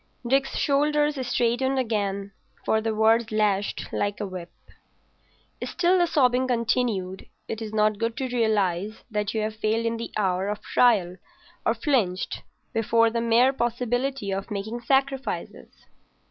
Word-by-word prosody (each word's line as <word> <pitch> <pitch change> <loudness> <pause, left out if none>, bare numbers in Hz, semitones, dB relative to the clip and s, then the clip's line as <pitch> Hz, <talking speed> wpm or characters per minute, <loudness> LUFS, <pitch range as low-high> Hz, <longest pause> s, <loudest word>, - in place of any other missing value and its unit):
Dick's 270 +2 +1
shoulders 295 -1 +1
straightened 245 +2 +1
again, 200 -5 -1 0.3
for 220 - +2
the 220 0 -1
words 225 +1 +3
lashed 205 -2 0
like 205 0 -1
a 210 - -2
whip. 185 -3 -7 1.1
Still 360 +1 +2
the 350 - +3
sobbing 255 -4 +2
continued. 230 -6 -1 0.2
It 225 0 -5
is 220 -1 -5
not 215 -1 +2
good 230 +1 -2
to 265 - -2
realise 210 -3 0
that 210 +1 -2
you 220 - +1
have 215 0 -3
failed 220 +1 0
in 230 0 0
the 230 - -5
hour 190 -2 0
of 210 0 -4
trial 195 -8 +3 0.5
or - - +3
flinched 220 - 0 0.3
before 230 0 +3
the 230 0 -1
mere 235 +3 +4
possibility 245 -1 -1
of 195 +2 -3
making 215 +3 -4
sacrifices. 270 +2 -1
225 Hz, 145 wpm, -25 LUFS, 210-250 Hz, 1.1 s, mere